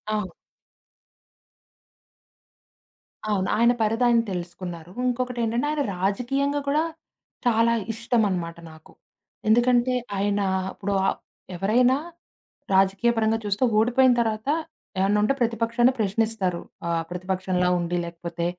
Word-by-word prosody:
అవును. 210 -3 -3 3.0
అవును. 195 -3 0
ఆయన 235 +2 +5
పరిదాయన 230 +2 +3
తెలుసుకున్నారు. 175 -1 -6 0.2
ఇంకొకటేంటంటే, 245 0 -1
ఆయన 305 -1 -1 0.2
రాజకీయంగా 260 +10 0
కూడా 300 +3 +2 0.6
చాలా 230 0 +3 0.2
ఇష్టం 230 +1 0
అనమాట 170 -3 -3
నాకు. 160 0 -17 0.5
ఎందుకంటే 240 +2 +4 0.2
ఆయన 205 +1 +1 0.3
ఇప్పుడు 200 0 -3
ఆప్ - - -1 0.4
ఎవరైనా? 245 +8 +3 0.8
రాజకీయ 195 +4 +3
పరంగా 225 0 +2
చూస్తే 205 +4 0 0.2
ఓడిపోయిన 245 +3 +4
తర్వాత 220 0 -2 0.5
ఏమన్నా 200 +2 +3
ఉంటే 215 - +3
ప్రతిపక్షాన్ని 235 +1 +2
ప్రశ్నిస్తారు. 200 -3 0 0.3
ఆహ్, 165 -1 0
ప్రతిపక్షంలా 185 0 -1
ఉండి 175 0 -1
లేకపోతే 170 0 -5
220 Hz, 100 wpm, -24 LUFS, 185-240 Hz, 3.0 s, ఆయన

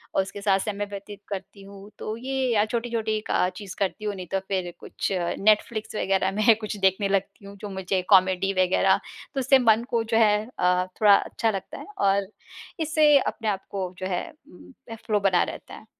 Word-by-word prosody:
और - - +4
उसके 195 +1 -7
साथ 195 -1 +2
समय 205 0 -3
व्यतीत 200 0 -8
करती 200 0 -7
हूँ। 200 +1 -12
तो 215 - -4
ये 260 0 -1
अ, 210 0 +3
छोटी-छोटी 225 -1 -2
का 180 - +2
चीज़ 200 -3 -8
करती 200 +2 -2
हूँ, 205 -1 -2
नहीं 185 -2 -8
तो 195 - +1
फिर 185 -3 -2
कुछ - - -4 0.3
नेटफ्लिक्स 215 +1 +1
वग़ैरह 190 -1 +1
में 215 +3 +4
कुछ 215 0 -4
देखने 195 +1 +2
लगती 200 +2 -2
हूँ, 200 - -10
जो 205 +1 -7
मुझे 190 -1 -2
कॉमेडी 190 0 +4
वग़ैरह। 185 0 +3 0.4
तो 275 - -2
उससे 265 +1 +4
मन 225 -1 +4
को 230 -1 +1
जो 225 0 0
है 210 -1 +3
अ, 180 0 +2 0.2
थोड़ा 205 -2 +8
अच्छा 225 +2 -1
लगता 195 -3 -6
है - - -9
और 195 0 +2 0.5
इससे 310 -2 +4
अपने 225 -3 -3
आप 195 -1 -3
को 185 -2 -4
जो 185 - -4
है 180 -2 -2 0.3
म 180 - -16 0.3
फ़्लो 210 -2 +1
बना 190 -3 +3
रहता - - -8
है। - - -14
200 Hz, 200 wpm, -25 LUFS, 195-220 Hz, 0.5 s, थोड़ा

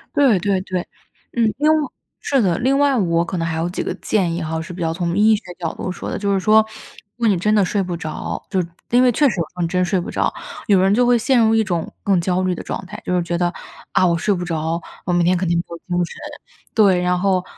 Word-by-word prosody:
对 265 -9 +5
对 195 0 +1
对， 185 -1 -3 0.6
嗯， 225 -2 +3
另 305 +2 +3
外 305 -3 +1 0.3
是 275 -3 +1
的， 180 -5 +1
另 265 +3 +2
外 280 -2 +3
我 170 -4 +2
可 180 - -4
能 165 0 -1
还 160 - -2
有 170 +2 -1
几 180 - -3
个 - - -2
建 180 -6 0
议 175 - -3
哈， 160 0 -3
是 175 +2 -8
比 175 - -7
较 165 -1 0
从 170 +1 -2
医 215 +1 +5
学 210 - -5 0.2
角 165 -2 -3
度 - - -5
说 180 - -6
的。 - - -3
就 200 -1 0
是 195 - +2
说， 215 +3 +5 0.6
如 240 - -7
果 - - +5
你 195 - +2
真 210 +5 +2
的 205 - +4
睡 200 +2 0
不 180 -2 -3
着， 160 -2 -5
就 190 -2 +1 0.3
因 245 +1 +4
为 255 - +5
确 290 +5 +4
实 210 - -3
有 - - +2
时 - - -37
候 180 - -4
你 170 - +1
真 180 0 +1
睡 185 +2 0
不 - - -6
着， - - 0 0.4
有 200 -3 +5
人 195 +1 +3
就 245 +3 +3
会 245 - +5
陷 250 +2 +2
入 225 -1 +4
一 220 - +3
种 175 -5 -3
更 195 -3 +2
焦 180 +1 0
虑 185 -1 +1
的 - - -6
状 190 - -5
态， - - -9
就 180 - 0
是 175 - +1
觉 170 0 -2
得， 175 0 +1 0.4
啊， - - +4
我 170 -2 +2
睡 200 +5 +1
不 180 - -4
着， 165 -1 -2 0.2
我 180 - 0
明 175 -1 +3
天 180 +1 +3
肯 180 -1 -1
定 170 0 +2
没 170 - 0
有 170 - -7
精 175 +1 -1
神。 - - -11 0.6
对， 195 -5 +5
然 180 0 +1
后 185 -1 +1
185 Hz, 305 characters per minute, -20 LUFS, 175-215 Hz, 0.6 s, 对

